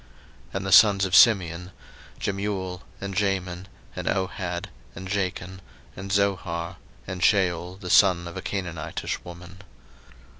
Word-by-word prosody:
01:046:010 - - -15
And 95 0 -2
the 95 - -2
sons 100 -1 +7
of 90 - +1
Simeon; 90 -5 +4 0.5
Jemuel, 95 -2 -3 0.2
and 100 -1 -5
Jamin, 95 -2 -1 0.3
and - - -5
Ohad, 90 -2 -2 0.3
and 95 +1 -7
Jachin, 95 -1 -3 0.4
and 95 +1 -7
Zohar, 90 -3 -1 0.3
and 95 -1 -6
Shaul 90 -1 +1
the 90 -3 -5
son 90 -4 +5
of 85 - -9
a - - -5
Canaanitish 85 -5 -4
woman. 85 +1 -11
95 Hz, 135 wpm, -25 LUFS, 90-100 Hz, 0.5 s, sons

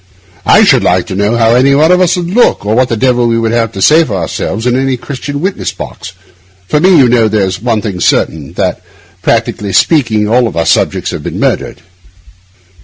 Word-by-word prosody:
I - - +5
should - - +4
like - - +1
to - - -6
know 100 +4 0
how 115 -1 +2
any 135 +3 +3
one 155 +4 +3
of 180 0 +3
us 180 0 +2
would 175 -1 -4
look, 240 - +1
or 105 - 0
what 125 +2 +1
the 115 - -2
devil 125 0 +1
we 115 - 0
should 115 -1 -1
have 115 -2 0
to 95 - -3
say 160 +2 +5
for 110 -10 -4
ourselves, 95 +5 -4
in 125 0 +1
any 135 0 -1
Christian 140 +3 -6
witness 190 +2 -3
box. 95 - -9 0.5
For 150 - +1
me, 185 +2 +4
you 135 -4 +5
know 115 -2 +2
there's 100 -3 -1
one 115 -3 -1
thing 100 -5 -4
certain—that, 80 -2 -1 0.4
practically 100 -2 -1
speaking, 115 -10 +1
all 115 -5 0
our 85 - 0
subjects - - 0
have - - -6
been - - -6
murdered. - - -2
120 Hz, 205 wpm, -11 LUFS, 105-140 Hz, 0.5 s, I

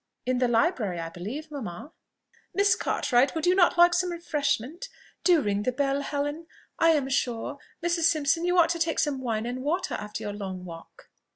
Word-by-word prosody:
"In 255 0 0
the 250 - +3
library, 230 - +1
I 165 0 -4
believe, 235 - -7
mamma." 265 - -7 0.6
"Miss 400 -1 +4
Cartwright, 255 +2 +1
would 320 - -1
you 360 - +5
not 360 -2 +4
like 345 0 +7
some 360 +1 +1
refreshment?... 305 - -2 0.3
Do 350 -4 +5
ring 205 0 0
the 255 - 0
bell, 275 +2 0
Helen. 290 +3 -3 0.3
I 330 - +5
am 285 -4 0
sure, 245 -3 -2 0.3
Mrs. 345 -1 +1
Simpson, 325 0 +2
you 355 +1 +1
ought 335 -2 +5
to 335 0 -1
take 330 0 0
some 290 -4 0
wine 225 -3 -2
and 250 +2 -4
water 340 +7 -1
after 210 0 -5
your 205 - -4
long 190 -3 -6
walk." 165 -2 -12
285 Hz, 190 wpm, -27 LUFS, 230-335 Hz, 0.6 s, like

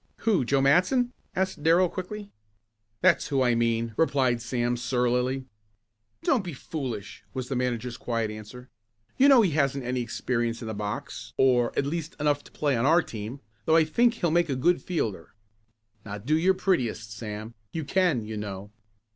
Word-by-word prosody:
"Who, 210 - +3
Joe 135 +2 +2
Matson?" 185 - +3 0.2
asked 190 -4 -1
Darrell 170 +4 +5
quickly. 200 +4 -6 0.7
"That's 185 -2 +4
who 135 -3 +1
I 125 -1 +3
mean," 115 -1 0
replied 130 -6 +2
Sam 120 0 -1
surlily. 125 +1 0 0.8
"Don't 245 -7 +2
be 175 -3 -5
foolish," 130 -7 -6
was 130 -1 -4
the 135 - -1
manager's 125 -1 -2
quiet 115 -3 -2
answer. 110 +4 -10 0.5
"You 275 - +6
know 260 -5 +7
he 185 - +2
hasn't 140 -2 +1
had 125 - -4
any 125 0 0
experience 120 -1 -2
in 115 - -7
the 110 - -3
box 105 0 -5
or 125 -2 +4
at 140 - +2
least 165 +2 -3
enough 145 -1 +1
to - - -15
play 145 -3 0
on 115 +3 +1
our 165 +3 +5
team, 110 +5 -7 0.2
though 160 - +4
I 165 - +6
think 235 +9 +3
he'll 175 -7 0
make 170 -1 +2
a 135 - 0
good 170 +8 +2
fielder. 110 - -3 0.7
Now 100 -1 -6
do 130 +10 0
your 185 +4 +3
prettiest 120 - 0
Sam. 110 0 -6 0.2
You 160 - -3
can, 170 - +1
you 110 0 -5
know." 100 -1 -6
130 Hz, 180 wpm, -27 LUFS, 115-165 Hz, 0.8 s, know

